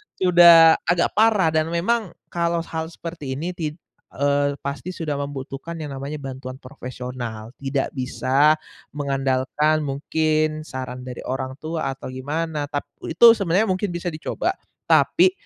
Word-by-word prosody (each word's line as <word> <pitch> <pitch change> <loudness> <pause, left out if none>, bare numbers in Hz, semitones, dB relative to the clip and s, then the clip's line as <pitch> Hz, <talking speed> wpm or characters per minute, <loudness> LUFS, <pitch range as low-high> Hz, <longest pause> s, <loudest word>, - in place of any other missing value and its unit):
sudah 170 -3 +7
agak 175 0 +2
parah 210 -7 +3
dan 155 0 +1
memang 185 +4 -1 0.2
kalau 170 -1 0
hal 160 -1 -4
seperti 165 -5 -6
ini 170 +6 -3
tid 155 -4 -4 0.4
eee, 145 0 +1
pasti 140 +6 -4
sudah 150 -3 -3
membutuhkan 140 +3 -6
yang 150 -2 -5
namanya 140 +3 -5
bantuan 130 -1 -7
profesional, 125 -4 -7
tidak 135 0 -1
bisa 135 +3 +2 0.4
mengandalkan 140 +2 +1
mungkin 155 +2 0
saran 130 -1 -6
dari 125 - -7
orang 130 0 -3
tua 155 -3 -3
atau 135 - -8
gimana 150 +3 -3
tap 145 - -3 0.2
itu 230 +8 +7
sebenarnya 200 +2 +1
mungkin 185 +2 -1
bisa 175 +1 -4
dicoba, 155 0 -2 0.4
tapi 365 +2 +5
150 Hz, 135 wpm, -23 LUFS, 135-170 Hz, 0.4 s, sudah